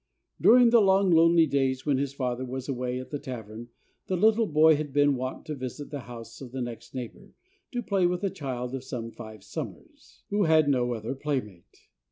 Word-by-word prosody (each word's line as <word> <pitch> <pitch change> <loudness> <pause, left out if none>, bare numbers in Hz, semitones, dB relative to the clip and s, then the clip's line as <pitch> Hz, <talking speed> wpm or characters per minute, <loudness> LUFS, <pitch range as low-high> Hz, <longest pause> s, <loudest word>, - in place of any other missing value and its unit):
During 240 0 +7
the 235 -1 +6
long 195 -1 +4
lonely 165 0 +6
days 135 -3 0
when 140 -3 +2
his 140 -1 -1
father 130 -2 -3
was 130 0 -5
away 125 -2 -2
at 130 - -9
the 145 - -3
tavern 120 -4 -8 0.4
the 185 - 0
little 220 +3 +3
boy 155 0 +5
had 150 -1 -4
been 145 0 +3
wont 130 +1 -5
to 155 - -4
visit 140 +2 -7
the 145 - -4
house 115 -1 -10
of 130 -3 -9
the 130 - -5
next 120 +1 -8
neighbor, 125 -3 -8 0.4
to 245 -1 -3
play 195 -4 +2
with 180 +1 -2
a 195 - 0
child 125 -4 -5
of 135 -1 -4
some 120 -3 -6
five 110 -3 -11
summers, - - -9
who 205 -1 +2
had 160 -2 +4
no 125 -3 +1
other 110 +3 -4
playmate. 130 -10 -5
135 Hz, 205 wpm, -27 LUFS, 125-160 Hz, 0.4 s, During